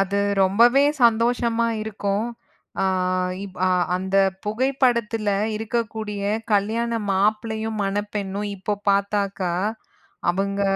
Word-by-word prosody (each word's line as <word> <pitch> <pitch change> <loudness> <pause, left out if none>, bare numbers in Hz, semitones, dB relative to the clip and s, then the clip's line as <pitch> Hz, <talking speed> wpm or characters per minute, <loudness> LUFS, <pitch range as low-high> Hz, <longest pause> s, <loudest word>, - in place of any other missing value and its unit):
அது 195 +1 0 0.3
ரொம்பவே 235 +9 +5 0.2
சந்தோஷமா 235 0 +2
இருக்கும். 205 0 -2 0.6
அ - - +2 0.6
இப் 190 -2 -11
அ - - +3 0.3
அந்தப் 190 +1 +1
புகைப்படத்துல 235 -2 +1 0.3
இருக்கக்கூடிய 220 -2 -3 0.3
கல்யாண 220 +4 +1 0.2
மாப்ளையும், 220 +2 0
மணப்பெண்ணும் 205 0 -3
இப்போ 195 +2 -2
பாத்தாக்கா, 200 -2 0 0.8
அவுங்க 200 +2 -1
210 Hz, 90 wpm, -23 LUFS, 195-230 Hz, 0.8 s, ரொம்பவே